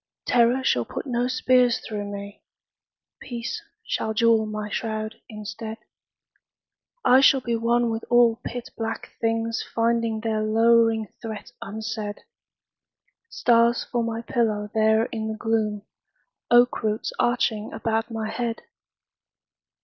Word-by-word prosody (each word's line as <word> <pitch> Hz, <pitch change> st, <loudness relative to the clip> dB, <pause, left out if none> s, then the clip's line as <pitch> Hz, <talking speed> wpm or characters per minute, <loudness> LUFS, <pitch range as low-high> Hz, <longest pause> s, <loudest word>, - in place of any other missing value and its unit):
Terror 245 Hz, +2 st, +3 dB
shall 125 Hz, -, +2 dB
put -, -, -6 dB
no 245 Hz, -2 st, 0 dB
spears 255 Hz, -1 st, +3 dB
through 210 Hz, -2 st, -5 dB
me. 200 Hz, 0 st, -8 dB, 0.8 s
Peace 240 Hz, -, -5 dB, 0.2 s
shall 220 Hz, 0 st, -2 dB
jewel 225 Hz, -1 st, +4 dB
my 215 Hz, 0 st, -4 dB
shroud 215 Hz, 0 st, -4 dB
instead. 220 Hz, +1 st, -7 dB, 1.3 s
I 255 Hz, +2 st, +7 dB
shall 270 Hz, 0 st, +6 dB
be 235 Hz, -2 st, -2 dB
one 235 Hz, +1 st, +1 dB
with 225 Hz, 0 st, -3 dB
all 240 Hz, -1 st, +4 dB
pit 245 Hz, 0 st, -6 dB
black 225 Hz, 0 st, -4 dB
things 225 Hz, 0 st, 0 dB
Finding 230 Hz, -1 st, +1 dB
their 220 Hz, -1 st, -1 dB
lowering 225 Hz, 0 st, +3 dB, 0.2 s
threat 220 Hz, -2 st, -7 dB
unsaid: 215 Hz, 0 st, -5 dB, 1.1 s
Stars 235 Hz, -, +3 dB
for 240 Hz, -, -2 dB
my 230 Hz, 0 st, -3 dB
pillow 210 Hz, -4 st, -1 dB
there 220 Hz, 0 st, +3 dB
in 220 Hz, -2 st, -4 dB
the 220 Hz, 0 st, -4 dB
gloom,— 215 Hz, -2 st, -1 dB, 0.7 s
Oak 240 Hz, +1 st, +5 dB
roots 215 Hz, -1 st, -1 dB
arching 240 Hz, -3 st, +1 dB
about 225 Hz, 0 st, -1 dB
my 225 Hz, -1 st, -3 dB
head! 230 Hz, +1 st, -3 dB
225 Hz, 125 wpm, -24 LUFS, 220-235 Hz, 1.3 s, I